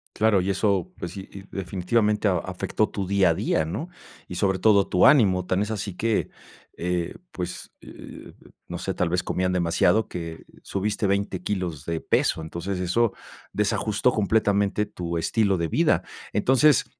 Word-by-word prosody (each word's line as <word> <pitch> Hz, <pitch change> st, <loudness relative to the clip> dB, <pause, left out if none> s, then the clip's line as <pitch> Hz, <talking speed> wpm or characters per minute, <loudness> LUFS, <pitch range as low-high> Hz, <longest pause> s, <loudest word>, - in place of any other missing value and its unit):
Claro, 110 Hz, -3 st, +3 dB
y 95 Hz, +2 st, 0 dB
eso, 100 Hz, -1 st, 0 dB
pues 90 Hz, 0 st, -5 dB
sí, 95 Hz, -1 st, -8 dB
y 100 Hz, -, -9 dB
definitivamente 105 Hz, +3 st, 0 dB
a 90 Hz, -3 st, +2 dB
afectó 95 Hz, +4 st, -1 dB
tu 100 Hz, -2 st, -4 dB
día 100 Hz, 0 st, +3 dB
a -, -, +3 dB
día, 80 Hz, -, 0 dB
¿no?, 140 Hz, -, -4 dB, 0.4 s
y 90 Hz, -, -7 dB
sobre 95 Hz, 0 st, +1 dB
todo 100 Hz, -1 st, +4 dB
tu 90 Hz, -, +5 dB
ánimo. 95 Hz, -10 st, +4 dB
Tan 95 Hz, +2 st, +1 dB
es 105 Hz, -, -4 dB
así 100 Hz, -3 st, -4 dB
que, 110 Hz, +2 st, 0 dB, 0.5 s
eh, 90 Hz, -1 st, -2 dB, 0.2 s
pues, 90 Hz, -1 st, -6 dB
eh, -, -, -11 dB, 0.4 s
no -, -, -5 dB
sé, -, -, -3 dB
tal 90 Hz, -, 0 dB
vez 90 Hz, +1 st, 0 dB
comían 90 Hz, 0 st, -1 dB
demasiado, 90 Hz, +5 st, +2 dB
que 85 Hz, -2 st, -7 dB, 0.2 s
subiste 105 Hz, +1 st, -1 dB
20 100 Hz, -1 st, -1 dB
kilos 90 Hz, -7 st, -3 dB
de 85 Hz, -1 st, -2 dB
peso, -, -, +1 dB
entonces 85 Hz, +4 st, -4 dB
eso 100 Hz, +5 st, +1 dB, 0.4 s
desajustó 105 Hz, +3 st, +1 dB
completamente 105 Hz, -1 st, +1 dB
tu 85 Hz, -4 st, -4 dB
estilo 100 Hz, +3 st, +1 dB
de 85 Hz, -1 st, -1 dB
vida. -, -, +2 dB, 0.3 s
Entonces, 130 Hz, +5 st, +4 dB
95 Hz, 165 wpm, -25 LUFS, 90-105 Hz, 0.5 s, tu